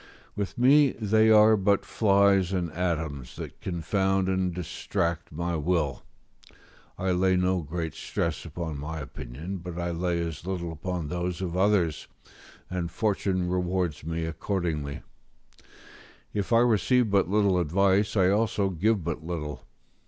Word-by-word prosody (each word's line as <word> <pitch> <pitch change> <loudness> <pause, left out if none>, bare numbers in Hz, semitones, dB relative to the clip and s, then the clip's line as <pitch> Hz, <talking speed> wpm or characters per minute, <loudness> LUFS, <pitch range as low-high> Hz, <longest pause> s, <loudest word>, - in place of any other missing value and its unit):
With 100 -2 -4
me, 140 +3 +5
they 110 0 +3
are 110 0 +7
but 100 -1 +2
flies 100 -3 +3
and 85 -3 -1
atoms, 80 -7 -3
that - - -8
confound 95 +2 0
and 95 -1 0
distract 85 0 -3
my 85 +2 -2
will; 75 -4 0 1.0
I 95 0 0
lay 95 +1 +3
no 90 0 +1
great 80 +1 -4
stress - - -3
upon 80 -2 -5
my 75 +3 -5
opinions; 75 +6 -7
but 90 -1 -7
I 85 0 -2
lay 85 0 -1
as 80 -4 -5
little 90 -2 -3
upon 80 0 -4
those 90 +1 -3
of 90 -2 -3
others, 95 -5 +1 0.6
and 90 -2 -3
fortune 95 -1 0
rewards 90 -4 -1
me 80 +1 -3
accordingly: 80 -4 -3 1.3
if 100 +3 -2
I 115 0 +6
receive 120 0 +3
but 100 -2 +3
little 100 -2 +3
advice, 95 +5 +2
I 95 -1 +4
also 100 -1 +1
give 100 +3 +1
but 80 -1 -4
little. 80 -3 -5
90 Hz, 140 wpm, -27 LUFS, 85-100 Hz, 1.3 s, are